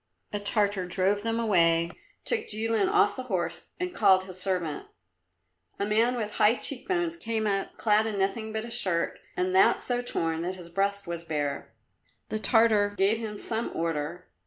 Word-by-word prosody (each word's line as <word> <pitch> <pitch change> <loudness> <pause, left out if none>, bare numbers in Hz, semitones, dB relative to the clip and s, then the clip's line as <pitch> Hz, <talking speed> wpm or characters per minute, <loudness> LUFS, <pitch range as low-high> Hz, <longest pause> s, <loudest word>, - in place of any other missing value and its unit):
A 205 - -1
Tartar 205 -2 0
drove 190 +3 +1
them 225 +1 -1
away, 170 -6 +3 0.3
took 455 -2 +2
Jilin 225 - +1
off 415 +1 +3
the 260 - -4
horse 170 -4 -2
and 360 0 -3
called 190 - +4
his 185 -1 -5
servant. 180 -5 -2 0.9
A 200 - -1
man 225 +4 +2
with 215 -3 -3
high 215 +3 +5
cheek 275 +5 -5
bones 345 -3 0
came 225 -8 -2
up, 195 -2 -1
clad 215 0 +3
in 210 -2 -3
nothing 220 +3 -1
but 220 +1 -3
a 235 - -9
shirt, 185 -8 0 0.2
and 185 0 0
that 190 - +5
so 245 -1 -1
torn 165 -9 -2
that 180 +2 -3
his 175 -2 -11
breast 200 +3 -1
was 170 -1 -5
bare. 150 -3 -3 0.5
The 215 - -2
Tartar 215 -3 +3
gave 200 +4 +2
him 215 -2 -5
some 225 +2 -3
order. 165 +1 -2
205 Hz, 180 wpm, -28 LUFS, 180-225 Hz, 0.9 s, high